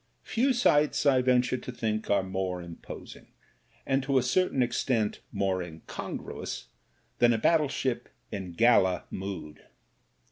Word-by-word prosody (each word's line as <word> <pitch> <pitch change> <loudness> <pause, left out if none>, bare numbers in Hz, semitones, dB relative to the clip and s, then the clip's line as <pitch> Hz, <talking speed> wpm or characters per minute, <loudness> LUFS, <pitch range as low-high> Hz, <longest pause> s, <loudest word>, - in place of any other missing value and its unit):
Few 260 +4 +1
sights, 150 - +3
I 135 -3 +5
venture 125 0 +2
to 125 - -7
think, 110 -3 -2
are 100 -1 +3
more 95 -1 -2
imposing, 85 -1 -10 0.6
and 135 0 +2
to 135 0 +1
a 130 - +3
certain 130 0 +2
extent 120 -3 0
more 95 -2 0
incongruous, 80 -6 -6 0.5
than 120 -1 +5
a - - +1
battleship 135 -2 +1 0.2
in 95 -4 -5
gala 95 -3 +4
mood. 95 -6 -6
120 Hz, 130 wpm, -28 LUFS, 95-135 Hz, 0.6 s, I